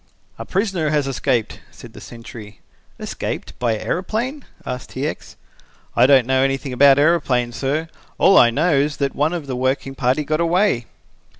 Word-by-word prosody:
"A - - -6
prisoner 190 -5 -1
has 150 -2 +1
escaped," 130 -3 -1
said - - -14
the - - -12
sentry. 110 -3 -11 0.4
"Escaped - - -5
by 115 -3 0
aeroplane?" 230 - -3 0.2
asked 125 0 -6
T. 135 +2 -4
X. 155 - -6 0.6
"I 120 +2 +5
don't 135 -3 +5
know 130 +1 +2
anything 135 0 -1
about 140 +2 +6
aeroplanes, 140 -6 +1
sir. 145 +6 -1 0.3
All 195 - +5
I 120 - +7
know 155 +8 +1
is 145 +1 +1
that 140 -1 -1
one 150 +2 0
of 170 -4 -4
the 130 -2 -4
working 130 +1 -1
party 130 +2 0
got 155 +2 -1
away." 170 - +1
140 Hz, 170 wpm, -20 LUFS, 125-160 Hz, 0.6 s, I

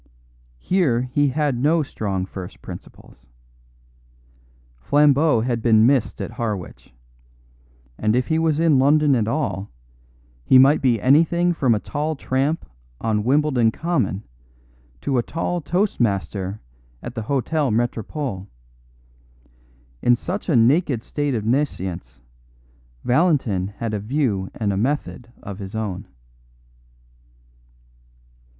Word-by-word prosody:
Here 145 - +1
he 130 +3 +1
had 145 0 0
no 155 +4 +2
strong 100 -8 -3
first 95 -1 -9
principles. - - -12 1.5
Flambeau 145 - +3
had 120 -1 -1
been 110 -1 +5
missed 130 -2 +1
at - - -4
Harwich; 105 -6 -5 1.1
and 105 +1 +1
if 125 0 +1
he 160 0 +1
was 160 -2 +1
in 160 -5 +4
London 145 +1 +4
at 110 -3 0
all, 115 -7 -2 0.7
he 130 - +5
might 135 +4 +6
be 125 -5 +2
anything 165 +7 +3
from 130 -8 +2
a - - -1
tall 150 +6 -3
tramp 135 +4 -1 0.3
on 110 -2 0
Wimbledon 130 -2 +2
Common 160 - -1 0.8
to 130 - 0
a - - +3
tall 170 +6 -3
toast 185 +7 -1
master 100 -3 -1 0.4
at - - -6
the - - -4
Hotel 140 +4 0
Metropole. 115 -1 -2 1.5
In 120 - +4
such 185 - -5
a 155 - +3
naked 125 +1 +3
state 145 -1 -2
of 110 -2 -3
nescience, 95 - -2 0.8
Valentin 125 - +1
had 115 -2 -3
a 105 - -1
view 105 -4 -1
and 105 -3 -1
a - - -2
method 125 0 -2
of 100 0 -7
his 95 +1 -7
own. 100 -4 -4
125 Hz, 120 wpm, -22 LUFS, 110-150 Hz, 1.5 s, might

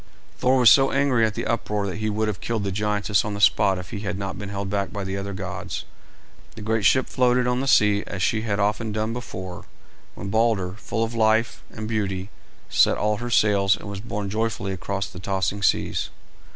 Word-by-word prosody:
Thor 130 +1 +3
was 125 -3 +7
so 135 -1 +6
angry 135 -4 +2
at 110 - -5
the - - -3
uproar 105 -3 -1
that 95 - -4
he 110 0 -1
would 110 +1 0
have 100 -5 -3
killed 115 -3 -2
the 100 - -2
giantess 105 +1 +1
on 105 -1 -4
the - - -5
spot 95 -1 +4
if 90 0 -8
he 100 - -4
had 105 -2 -3
not 100 -1 -4
been 100 -1 -6
held 100 0 -4
back 100 0 -2
by 100 -2 -4
the 95 0 -3
other 100 0 -4
gods. 95 -2 -5 0.7
The 110 - -8
great 110 -1 0
ship 130 - +4
floated 125 0 +2
on 125 +1 +1
the 135 - -2
sea 105 -5 +4
as 95 -3 -3
she 110 - +1
had 105 -2 -2
often 105 +2 0
done 110 +2 -2
before, 95 -7 -7 0.5
when 100 - -6
Balder, 110 -4 +1
full 115 +1 -2
of 115 +1 -3
life 110 0 +2
and 110 -1 -6
beauty, 100 -3 -2 0.4
set - - +3
all 105 0 +1
her 120 +2 -5
sails 100 -3 +3
and - - -10
was 100 -1 -5
borne 105 -1 -4
joyfully 105 -3 -2
across 95 +1 -3
the 90 - -10
tossing 95 +2 -1
seas. - - +1
105 Hz, 215 wpm, -24 LUFS, 100-115 Hz, 0.7 s, was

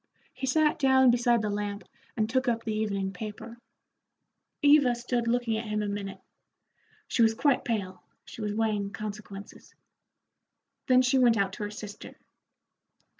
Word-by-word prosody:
He 265 0 -5
sat 305 +3 +2
down 265 -2 +5
beside 240 -1 +2
the 210 - -1
lamp 205 0 -3 0.3
and 215 -1 +1
took 260 +3 0
up 230 -1 0
the 220 - -2
evening 200 -3 -2
paper. 220 +4 -8 1.0
Eva 285 -4 +5
stood 240 0 -2
looking 235 -2 0
at 225 0 -5
him 210 0 -1
a - - -2
minute. 200 -1 -5 0.9
She - - 0
was 225 -1 +4
quite 270 +1 +2
pale, 195 -6 -3 0.2
she - - -10
was 210 -1 -2
weighing 210 -2 0
consequences. 205 -1 -9 1.1
Then 255 0 +5
she 255 +1 +3
went 240 -3 +4
out 195 -1 0
to 210 - -6
her - - -5
sister. 210 0 -9
225 Hz, 155 wpm, -28 LUFS, 205-245 Hz, 1.1 s, down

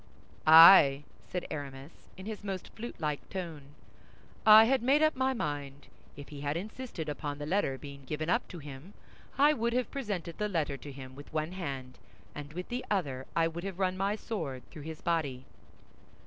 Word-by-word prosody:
"I," 160 -3 +9 0.2
said 180 -1 -4
Aramis, 140 0 -6 0.3
in 190 - -9
his 215 -1 -6
most 195 -2 -6
flutelike 155 -10 -4
tone, 155 -6 -7 0.7
"I 215 +1 +10
had 260 +2 +2
made 275 +5 +3
up 310 0 +3
my 260 0 +1
mind. 145 - -5 0.3
If 145 - -10
he 145 -2 -8
had 145 +2 -1
insisted 215 -3 -6
upon 145 -1 -4
the 145 - -5
letter 155 -5 0
being 140 -1 -11
given 155 +2 -3
up 175 - +1
to 180 - -9
him, 145 +4 -10 0.4
I 290 +2 +6
would 235 -3 -1
have 250 -1 -1
presented 200 -11 -4
the 210 0 0
letter 160 -7 -1
to 140 +2 -9
him 130 -1 -10
with 145 +2 -12
one 155 +1 -2
hand, 135 -8 -6 0.3
and 145 0 -8
with 180 +2 -6
the 250 +1 -3
other 140 -10 -2
I 165 -1 +3
would 170 +1 -6
have 195 -2 -5
run 185 -1 0
my 195 +2 0
sword 160 - -5
through 155 - -10
his 160 - -8
body." 145 -7 -1
165 Hz, 185 wpm, -30 LUFS, 145-205 Hz, 0.7 s, I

